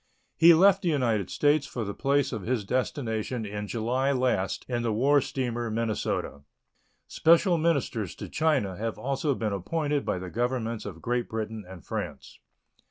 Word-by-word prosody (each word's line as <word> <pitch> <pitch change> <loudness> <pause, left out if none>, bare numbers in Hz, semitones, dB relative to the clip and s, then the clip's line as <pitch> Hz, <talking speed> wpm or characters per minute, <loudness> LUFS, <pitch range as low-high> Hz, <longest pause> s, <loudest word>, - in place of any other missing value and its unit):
He 170 0 +8
left 195 +3 +5
the 180 - 0
United 115 - +1
States 145 -1 +2
for 120 - -4
the 100 -1 -4
place 140 +3 +1
of 115 -5 -4
his 110 +1 -1
destination 120 -1 -2
in 105 0 -5
July 125 +5 0
last 125 -8 0
in 120 -2 -1
the 115 -1 0
war 140 +6 +3
steamer 120 -3 -3
Minnesota. 110 -9 -2 0.7
Special 170 +1 +4
ministers 140 - 0
to - - -7
China 140 - +1
have 115 +1 -3
also 135 +1 -1
been 110 -4 -2
appointed 145 - -1
by - - -1
the 90 0 -7
Governments 115 -2 -2
of 80 -5 -9
Great 120 0 -1
Britain 110 -1 -4
and 90 -4 -11
France. - - -6
120 Hz, 165 wpm, -27 LUFS, 110-140 Hz, 0.7 s, He